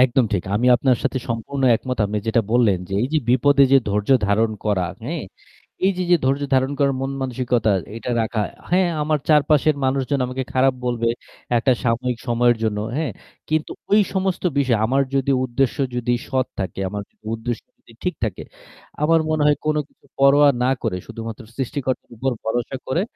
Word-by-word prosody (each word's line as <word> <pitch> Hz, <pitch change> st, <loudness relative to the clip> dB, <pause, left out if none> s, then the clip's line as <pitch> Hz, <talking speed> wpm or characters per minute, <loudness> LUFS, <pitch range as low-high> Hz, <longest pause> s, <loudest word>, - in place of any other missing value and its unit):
একদম 130 Hz, 0 st, +4 dB
ঠিক। 95 Hz, -4 st, 0 dB
আমিও 125 Hz, +4 st, +3 dB
আপনার 125 Hz, +1 st, +2 dB
সাথে 130 Hz, -, 0 dB
সম্পূর্ণ 120 Hz, +4 st, -3 dB
একমত। 125 Hz, +2 st, -5 dB
আপনি 105 Hz, +1 st, -2 dB
যেটা 115 Hz, +1 st, +3 dB
বললেন, 115 Hz, -6 st, +4 dB
যে -, -, -8 dB
এইযে 145 Hz, +5 st, +1 dB
বিপদে 140 Hz, +3 st, +4 dB
যে 135 Hz, -, +8 dB
ধৈর্য 105 Hz, 0 st, -1 dB, 0.2 s
ধারণ 110 Hz, +2 st, +2 dB
করা, 95 Hz, -4 st, +1 dB, 0.2 s
হ্যাঁ? 155 Hz, +7 st, -4 dB, 0.6 s
এইযে, 185 Hz, -1 st, +1 dB
যে 175 Hz, -, +7 dB
ধৈর্য 135 Hz, +2 st, +1 dB
ধারণ 130 Hz, +1 st, +2 dB
করার 140 Hz, -2 st, +2 dB
মন-মানসিকতা 130 Hz, -4 st, -1 dB, 0.3 s
এটা 115 Hz, -, -5 dB
রাখা, 110 Hz, -1 st, -1 dB, 0.3 s
হ্যাঁ 180 Hz, 0 st, +3 dB
আমার 155 Hz, 0 st, +1 dB
চারপাশের 150 Hz, 0 st, +4 dB
মানুষজন 135 Hz, +1 st, 0 dB
আমাকে 130 Hz, +1 st, -3 dB
খারাপ 130 Hz, 0 st, +3 dB
বলবে 120 Hz, -1 st, 0 dB, 0.5 s
একটা 130 Hz, +3 st, +3 dB
সাময়িক 120 Hz, +1 st, 0 dB
সময়ের 120 Hz, 0 st, +3 dB
জন্য, 110 Hz, -2 st, 0 dB, 0.2 s
হ্যাঁ? 150 Hz, -6 st, -1 dB, 0.4 s
কিন্তু 155 Hz, 0 st, 0 dB, 0.2 s
ওই 210 Hz, -, +6 dB
সমস্ত 190 Hz, -1 st, -1 dB, 0.2 s
বিষয় 130 Hz, -5 st, +2 dB
আমার 135 Hz, +4 st, +2 dB
যদি 135 Hz, 0 st, +1 dB
উদ্দেশ্য 130 Hz, +1 st, 0 dB, 0.2 s
যদি 120 Hz, 0 st, 0 dB
সৎ 130 Hz, -1 st, 0 dB
থাকে, 95 Hz, 0 st, -4 dB
আমার 100 Hz, +1 st, -4 dB, 0.3 s
উদ্দেশ্য 115 Hz, +1 st, -4 dB, 0.2 s
যদি -, -, -19 dB
ঠিক 180 Hz, -, 0 dB
থাকে, -, -, -4 dB, 0.6 s
আমার 165 Hz, +2 st, +4 dB
মনে 155 Hz, -1 st, +1 dB
হয় 150 Hz, 0 st, +4 dB
কোন 155 Hz, 0 st, +2 dB
কিছু -, -, -29 dB
পরোয়া 140 Hz, +1 st, +6 dB, 0.2 s
না 130 Hz, -, +3 dB
করে 90 Hz, -, -1 dB
শুধুমাত্র 115 Hz, +1 st, -7 dB
সৃষ্টিকর্তার 135 Hz, 0 st, -3 dB
উপর 130 Hz, +4 st, -1 dB
ভরসা 120 Hz, +3 st, -2 dB
করে 165 Hz, +7 st, 0 dB
130 Hz, 170 wpm, -21 LUFS, 115-140 Hz, 0.6 s, যে